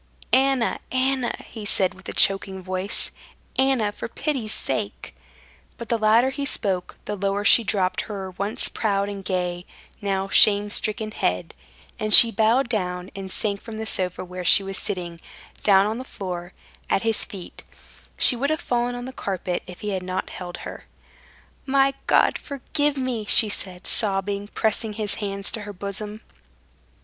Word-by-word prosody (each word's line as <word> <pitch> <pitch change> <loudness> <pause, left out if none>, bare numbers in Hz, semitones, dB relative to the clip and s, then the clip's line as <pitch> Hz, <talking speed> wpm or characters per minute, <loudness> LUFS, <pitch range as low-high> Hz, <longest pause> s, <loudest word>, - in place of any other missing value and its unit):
"Anna! 265 -2 +3
Anna!" 260 -1 +1
he 220 - -9
said 195 -2 +2
with 185 - -11
a - - -5
choking 195 -1 +2
voice, 185 +2 -1 0.4
"Anna, 265 -6 +2
for - - -6
pity's 260 -3 -2
sake!..." 125 - -3 0.6
But 235 - -8
the 235 - +1
louder 225 +4 +4
he 280 +1 -4
spoke, 195 -9 -2
the 210 - -3
lower 200 +1 -1
she 235 - +7
dropped 190 -3 +1
her 195 -3 -5
once 200 +6 -1
proud 200 -2 0
and 200 -1 -6
gay, 180 -2 -2 0.4
now 195 -1 -1
shame 205 +1 +5
stricken 215 0 0
head, 90 - -1 0.5
and 215 0 +6
she 230 - +10
bowed 230 +4 +3
down 180 -5 -3
and 190 -1 -6
sank 200 -1 -1
from 225 -2 -8
the 220 - -4
sofa 185 -3 -3
where 180 0 -7
she 190 +3 +5
was 195 0 -5
sitting, 175 -4 -5 0.4
down 195 -1 +5
on 220 +3 -2
the - - -5
floor, 180 -7 -6 0.4
at 195 - +1
his 225 -1 +1
feet; 195 -6 -9 0.5
she 250 - +7
would 275 +4 -1
have 310 0 0
fallen 245 0 -1
on 245 0 -6
the 260 - -7
carpet 185 -5 -3
if 180 -1 -10
he 210 - -3
had 190 -2 -2
not 185 +1 -4
held 175 -1 -7
her. - - -8 0.8
"My 270 0 +3
God! - - +4
Forgive 290 +1 -2
me!" 255 -4 -2
she 215 +1 +5
said, 185 -2 -3
sobbing, 200 -1 -1
pressing 220 +1 0
his 210 -1 -1
hands 200 -1 -3
to 220 - -5
her 205 0 -7
bosom. 205 +3 -6
205 Hz, 170 wpm, -24 LUFS, 190-230 Hz, 0.8 s, she